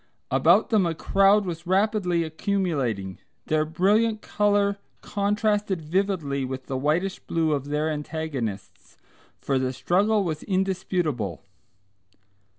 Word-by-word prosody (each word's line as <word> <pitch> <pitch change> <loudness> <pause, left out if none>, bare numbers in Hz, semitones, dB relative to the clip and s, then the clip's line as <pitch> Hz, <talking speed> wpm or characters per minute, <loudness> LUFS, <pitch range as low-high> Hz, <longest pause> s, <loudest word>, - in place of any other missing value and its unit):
About - - +4
them 205 -5 +3
a 165 - -2
crowd 195 +5 +3
was 170 -1 -6
rapidly 190 -3 +1
accumulating. 155 - -2 0.3
Their 155 0 +1
brilliant 210 +7 +1
colour 205 -1 +1 0.2
contrasted 205 -1 0
vividly 160 -4 -1
with 130 0 -5
the 135 - -4
whitish 160 +8 0
blue 160 -1 -1
of 140 -2 -1
their 150 +2 -1
antagonists, 135 - -5 0.4
for 135 -1 -1
the 130 0 -1
struggle 200 - +1
was 160 -4 -3
indisputable. 180 - -1
170 Hz, 115 wpm, -25 LUFS, 145-200 Hz, 0.4 s, About